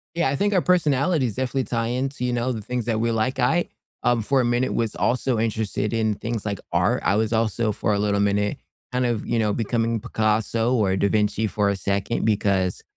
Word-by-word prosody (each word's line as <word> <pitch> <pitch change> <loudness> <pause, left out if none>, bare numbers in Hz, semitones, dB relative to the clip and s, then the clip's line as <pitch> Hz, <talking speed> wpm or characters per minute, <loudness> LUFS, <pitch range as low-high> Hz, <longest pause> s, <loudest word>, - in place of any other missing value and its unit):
Yeah, 170 -4 +2
I 135 - 0
think 205 +7 +1
our 185 - +3
personalities 150 - +2
definitely 130 +1 -1
tie 115 -2 -2
into, 130 +3 -2
you 125 0 0
know, 120 +1 0
the 115 -3 -4
things 125 +2 -3
that 115 -2 0
we 115 +1 +1
like 115 +4 -1
I, 165 +8 +2 0.3
um, 120 -2 +2
for 135 +5 +2
a - - 0
minute 120 +2 +1
was 115 -2 -1
also 125 -1 0
interested 110 -2 -1
in 110 -2 +1
things 115 0 -4
like 100 -2 -2
art. - - +1
I - - +2
was 110 +1 0
also, 110 0 +1
for 105 0 -1
a 100 - 0
little 100 0 +1
minute, 100 0 +1 0.3
kind 125 0 0
of, 115 -3 -2
you 120 - 0
know, 105 -2 +1
becoming 115 +1 0
Picasso 110 +3 0
or 100 -6 +2
da 100 - +2
Vinci 110 +1 +1
for 105 -1 0
a 100 - 0
second, 100 +4 -1
because, 100 -4 +1
115 Hz, 220 wpm, -23 LUFS, 105-125 Hz, 0.3 s, our